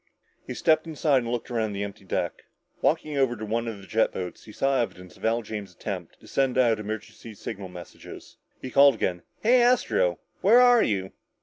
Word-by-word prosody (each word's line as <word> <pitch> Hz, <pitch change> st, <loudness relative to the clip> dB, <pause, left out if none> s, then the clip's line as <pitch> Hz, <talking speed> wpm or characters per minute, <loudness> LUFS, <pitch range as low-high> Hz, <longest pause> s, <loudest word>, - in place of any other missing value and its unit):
He -, -, -5 dB
stepped 160 Hz, -1 st, +2 dB
inside 150 Hz, -3 st, +2 dB
and 120 Hz, -1 st, -4 dB
looked 120 Hz, +1 st, -3 dB
around 110 Hz, -3 st, -1 dB
the 100 Hz, +1 st, -3 dB
empty 100 Hz, -1 st, -8 dB
deck. -, -, -3 dB, 0.4 s
Walking 155 Hz, -2 st, +1 dB
over 130 Hz, -3 st, +2 dB
to 110 Hz, -1 st, -6 dB
one 115 Hz, +2 st, -1 dB
of 115 Hz, -3 st, -4 dB
the 100 Hz, -, -13 dB
jet 110 Hz, +3 st, +1 dB
boats, 90 Hz, -1 st, -6 dB
he 110 Hz, -, -11 dB
saw 135 Hz, +3 st, +1 dB
evidence 90 Hz, -5 st, -6 dB
of -, -, -19 dB
Al 115 Hz, +1 st, +1 dB
James's 105 Hz, -4 st, -7 dB
attempts 90 Hz, -4 st, -6 dB
to -, -, -18 dB
send 135 Hz, -2 st, 0 dB
out 115 Hz, -4 st, +3 dB
emergency 110 Hz, +1 st, -7 dB
signal 100 Hz, -1 st, -6 dB
messages. 90 Hz, -2 st, -11 dB, 0.2 s
He 130 Hz, -, -7 dB
called 140 Hz, 0 st, +6 dB
again. 90 Hz, -5 st, -2 dB, 0.2 s
"Hey, 245 Hz, +3 st, +5 dB
Astro 360 Hz, -, +2 dB, 0.2 s
where 240 Hz, -, +6 dB
are 245 Hz, -2 st, +6 dB
you?" 95 Hz, -3 st, 0 dB
115 Hz, 200 wpm, -26 LUFS, 100-140 Hz, 0.4 s, called